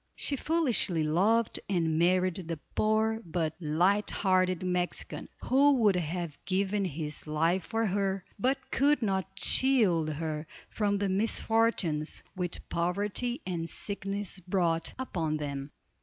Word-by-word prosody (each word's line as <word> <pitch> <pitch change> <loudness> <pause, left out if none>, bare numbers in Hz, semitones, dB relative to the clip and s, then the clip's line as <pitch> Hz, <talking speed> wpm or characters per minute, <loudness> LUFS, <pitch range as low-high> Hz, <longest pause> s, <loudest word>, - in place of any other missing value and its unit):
She 285 - -2
foolishly 255 - +1
loved 205 +9 +2
and 165 -4 +1
married 180 0 +2
the 165 -1 -3 0.2
poor 220 +1 +1
but 160 -3 -2
light 180 +6 +2
hearted 185 -2 +1
Mexican, 180 -1 -2
who 280 +3 +5
would 215 -7 +3
have 170 -2 -3
given 195 +2 0
his 155 -3 -4
life 165 +4 +1
for 225 0 -1
her, 195 -1 -1
but 260 +6 +2
could 285 -2 +3
not 190 -3 0
shield 195 -8 +4
her 155 0 -4 0.2
from 205 -2 0
the 200 0 0
misfortunes 200 -6 +1
which 180 -2 -4
poverty 205 - -1
and 165 -2 -3
sickness 200 -1 -4
brought 175 -2 0
upon 165 -12 -2
them. 140 -1 -4
185 Hz, 125 wpm, -29 LUFS, 165-215 Hz, 0.2 s, who